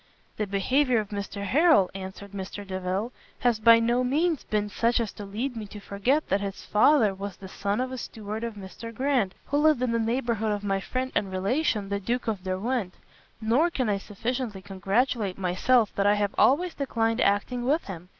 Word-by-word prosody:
"The 210 - -1
behaviour 250 +7 +2
of 210 -2 -4
Mr 200 0 -5
Harrel," 295 - +4
answered 190 +1 -8
Mr 200 +1 -6
Delvile, 190 +4 -2 0.3
"has 240 -3 +2
by 230 +1 +7
no 240 +2 +2
means 305 +5 +1
been 210 -1 -1
such 230 +3 +1
as 230 -3 -2
to 205 - -8
lead 235 +6 -3
me 215 -2 -5
to 210 +1 -9
forget 240 +10 0
that 195 +1 +2
his 200 -1 -5
father 215 -1 +4
was 195 0 -6
the 190 - -10
son 200 +3 -2
of 255 0 -2
a 260 - -5
steward 215 0 -6
of 230 -2 -4
Mr 205 +3 -8
Grant, 250 -5 0
who 285 - 0
lived 300 -4 +4
in 250 - +1
the 230 - +1
neighbourhood 225 -2 0
of 205 0 -4
my 195 -1 0
friend 255 +6 -3
and 195 - 0
relation 205 +2 0
the 200 0 -1
Duke 240 +5 -2
of 205 -5 -2
Derwent: 190 +2 -2 0.4
nor 235 +10 +3
can 255 -9 -1
I 200 -1 +1
sufficiently 225 0 -4
congratulate 200 +2 0
myself 200 +5 +2
that 200 0 +1
I 205 - +5
have 205 -1 0
always 335 +6 +3
declined 230 -4 0
acting 205 +5 +1
with 295 +7 +1
him. 180 -2 -8
215 Hz, 200 wpm, -27 LUFS, 200-250 Hz, 0.4 s, by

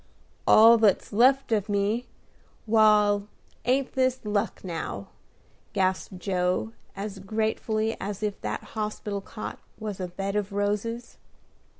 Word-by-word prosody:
"All 225 +1 +8
that's 210 -3 +2
left 260 +4 +4
of 210 -1 +1
me. 205 +4 0 0.6
Wal, 210 -2 +4 0.4
ain't 260 +2 +1
this 260 -1 +1
luck, 205 -1 -1
now?" 160 - -5 0.6
gasped 185 0 0
Joe, 180 +3 -1 0.2
as 200 0 -5
gratefully 220 +2 -1
as 205 +1 -4
if 205 -1 -2
that - - -3
hospital 210 -2 -3
cot 215 +2 -7 0.2
was 210 -3 -5
a 185 - -2
bed 195 +3 -4
of 205 -1 -1
roses. 210 +4 -2
210 Hz, 120 wpm, -27 LUFS, 195-220 Hz, 0.6 s, All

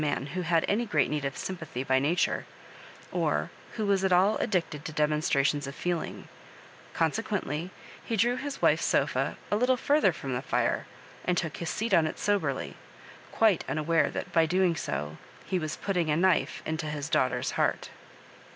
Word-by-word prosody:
man 145 -3 -1
who 185 - -1
had 165 -1 +2
any 215 +4 +1
great 215 - +1
need 150 -1 -1
of 135 -1 -3
sympathy 165 -9 -5
by 130 0 +3
nature, 155 +6 +1 0.7
or - - 0 0.2
who 220 - -2
was 200 -1 +2
at 190 - +2
all 190 +4 +5
addicted 170 -8 -1
to 155 - -5
demonstrations 150 -2 +1
of 140 - -7
feeling; 175 -2 -3 0.7
con 165 -2 +2
sequently, 185 -6 -3 0.3
he 230 - -2
drew 240 +4 +3
his 280 +1 -5
wife's - - +4
sofa - - +1
a - - +3
little 250 +4 +3
further 285 -6 +3
from 135 -5 -5
the 125 - -1
fire, - - 0 0.4
and 180 -1 0
took 160 -3 -2
his 170 - -3
seat 225 +2 -2
on 160 -2 +5
it - - -5
soberly, 205 -1 -1 0.6
quite 215 -6 +3
unaware 155 0 +2
that, - - -5
by 165 -1 +5
so - - -4
doing, 180 0 +2 0.7
he 185 - 0
was 155 -2 -4
putting 180 -5 -1
a 150 - +2
knife 170 -5 +2
into 160 0 -2
his 150 -1 -3
daughter's 150 -6 +1
heart. - - 0
170 Hz, 180 wpm, -28 LUFS, 150-195 Hz, 0.7 s, all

